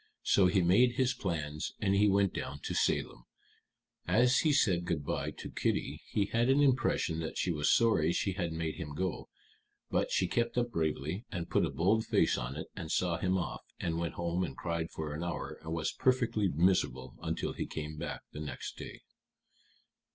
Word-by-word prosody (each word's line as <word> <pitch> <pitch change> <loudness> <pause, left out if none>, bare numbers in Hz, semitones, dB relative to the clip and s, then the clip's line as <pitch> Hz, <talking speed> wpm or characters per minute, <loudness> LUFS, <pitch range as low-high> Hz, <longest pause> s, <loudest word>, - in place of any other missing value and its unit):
So 95 -2 +5
he 95 0 +3
made 115 +8 +5
his 130 0 +2
plans 80 -8 -3
and 100 -2 +1
he 100 +1 +4
went 100 -1 +3
down - - -5
to - - -3
Salem. - - 0 0.8
As 120 +8 +4
he 155 - +3
said 95 -11 +3
good 80 -5 -2
by - - -1
to - - -7
Kitty - - -1
he 100 - +1
had 115 +4 +1
an 135 +2 +5
impression 130 - +2
that 80 -1 -4
she 90 - +1
was 75 -3 +2
sorry 105 -9 +4
she 100 - 0
had 90 -3 -2
made 80 -1 -3
him 75 -4 -6
go; 95 +2 -3 0.6
but - - +1
she 95 - +1
kept 120 +5 0
up 120 -1 +1
bravely, 80 - -2
and 85 -3 -4
put - - +3
a - - -4
bold 105 +6 +2
face - - +2
on 65 +2 -4
it, 80 - -5
and 85 -4 -5
saw 85 -2 +1
him 95 +1 +1
off, 90 - -3 0.2
and 85 -1 -1
went 85 -1 -3
home 85 +1 -1
and 70 -6 -5
cried 85 -1 -2
for 75 -2 -5
an 80 +3 -4
hour, 85 -1 -4
and 80 0 -7
was 80 -1 -1
perfectly 120 -5 +2
miserable 70 -7 +1
until - - -2
he - - -4
came 75 0 -5
back 80 +2 -5
the - - -8
next 75 - -6
day." - - -8
85 Hz, 195 wpm, -32 LUFS, 80-105 Hz, 0.8 s, So